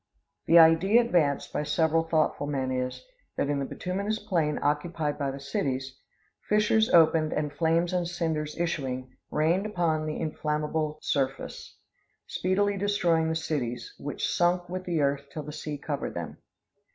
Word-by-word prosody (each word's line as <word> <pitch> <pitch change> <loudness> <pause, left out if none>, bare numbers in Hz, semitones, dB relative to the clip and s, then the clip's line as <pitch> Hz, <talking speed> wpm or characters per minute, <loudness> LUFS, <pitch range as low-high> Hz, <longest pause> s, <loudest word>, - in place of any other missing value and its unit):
The 170 - +7
idea 165 +7 +6
advanced 170 - +1
by - - 0
several 160 +2 +2
thoughtful 155 -3 0
men 135 -3 -1
is, 125 - -3 0.3
that 140 - 0
in 145 - 0
the 135 - -1
bituminous 200 +8 -3
plain 160 -8 0
occupied 150 0 -1
by 140 -1 0
the 135 +1 -6
cities, 135 -1 -3 0.5
fissures 215 +2 +3
opened 160 -3 +4
and 150 -1 -2
flames 165 +3 +1
and 175 -1 0
cinders 160 -3 -2
issuing, 130 -7 -3
rained 170 +7 +1
upon 165 -6 0
the 155 - -3
inflammable 155 0 -2
surface, 135 -2 -2 0.5
speedily 200 +2 0
destroying 175 -5 +1
the 160 - -1
cities, 150 - -3
which - - -3
sunk 175 0 +1
with 185 +1 -5
the 170 -4 0
earth 140 0 0
till 155 - -5
the 150 - -8
sea 150 -1 -5
covered 145 0 -4
them. - - -6
160 Hz, 150 wpm, -27 LUFS, 145-175 Hz, 0.5 s, The